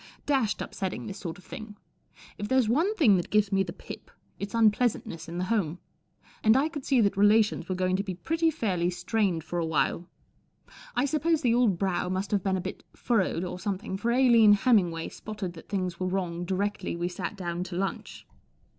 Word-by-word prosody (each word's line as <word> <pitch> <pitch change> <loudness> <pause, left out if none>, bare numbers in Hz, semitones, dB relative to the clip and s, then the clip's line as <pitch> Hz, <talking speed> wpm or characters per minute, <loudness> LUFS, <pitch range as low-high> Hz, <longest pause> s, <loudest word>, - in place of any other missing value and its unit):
Dashed 265 -8 +1
upsetting, 190 -2 -4
this 195 0 -7
sort 170 -1 -6
of 190 - -16
thing. 220 -5 -9 0.6
If 205 - -3
there's 260 -1 +3
one 325 - +2
thing 230 - +5
that 175 - -3
gives 210 -1 +2
me 195 0 +3
the 185 -3 -2
pip, 180 - -10 0.3
it's 200 +2 -5
unpleasantness 215 -7 +1
in 170 - -5
the 180 - -1
home; 185 -5 0 0.7
and 220 +3 +6
I 290 +4 +2
could 295 -4 -6
see 255 -3 +3
that 200 -2 +2
relations 205 -2 +3
were 185 - 0
going 185 0 +1
to 200 - -1
be 190 -3 -5
pretty 325 - +1
fairly 190 - 0
strained 180 -2 -1
lor 175 -1 0
a - - 0
while. 165 +2 0 0.9
I 245 +3 +2
suppose 310 +3 +1
the 240 -3 +3
old 235 -7 +3
brow 185 -1 -1
must 190 +2 -2
have 205 -2 +2
been 190 0 0
a - - -3
bit 190 - -6
furrowed 190 -7 0
or 180 0 -5
something, 195 0 -3
for 210 +5 -2
Aline 235 -4 +6
Hemmingway 190 -7 +2
spotted 205 -5 -6
that 165 - -13
things 185 -4 -2
were 185 - -1
wrong 175 -2 -2
directly 195 0 -2
we 175 +1 -2
sat 180 +3 -5
down 175 -1 -3
to 180 -1 -7
lunch. 195 +2 -4
200 Hz, 200 wpm, -28 LUFS, 180-230 Hz, 0.9 s, and